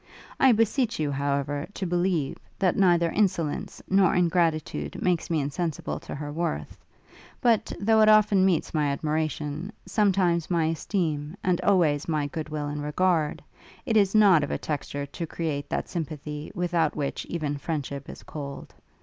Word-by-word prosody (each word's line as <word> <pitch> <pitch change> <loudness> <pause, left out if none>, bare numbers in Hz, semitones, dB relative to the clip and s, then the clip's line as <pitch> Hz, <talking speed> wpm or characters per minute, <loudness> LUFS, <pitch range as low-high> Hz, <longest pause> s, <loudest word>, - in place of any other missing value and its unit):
I 265 - +6
beseech 230 - +1
you, 150 -2 0
however, 140 +1 -1
to 195 - -3
believe, 175 -5 0 0.2
that 185 -3 +2
neither 175 -3 +3
insolence 175 -7 -1
nor 190 -1 +4
ingratitude 165 - 0
makes 180 -3 0
me 165 -2 +1
insensible 150 +3 -3
to - - -8
her 145 0 -5
worth; 110 - -3 0.6
but, 225 -3 +2
though 220 +2 +4
it 215 - +6
often 210 -3 +5
meets 185 -4 +1
my 150 -2 +1
admiration, 155 +3 -2
sometimes 185 -6 +2
my 170 -3 +2
esteem, 160 -2 -2
and 180 -2 +1
always 160 -7 +2
my 155 -3 0
good 155 +2 -5
will 150 -1 -3
and 145 0 -4
regard, 155 0 0 0.4
it 225 - 0
is 200 -1 +4
not 195 -8 +6
of 145 - -3
a - - -1
texture 145 -1 -4
to 165 +4 -6
create 150 -3 -3
that - - -2
sympathy 150 -3 -5
without 175 -2 0
which 145 -2 -3
even 150 -4 -2
friendship 140 -3 -4
is - - -10
cold. 140 -2 -8
165 Hz, 160 wpm, -26 LUFS, 145-185 Hz, 0.6 s, I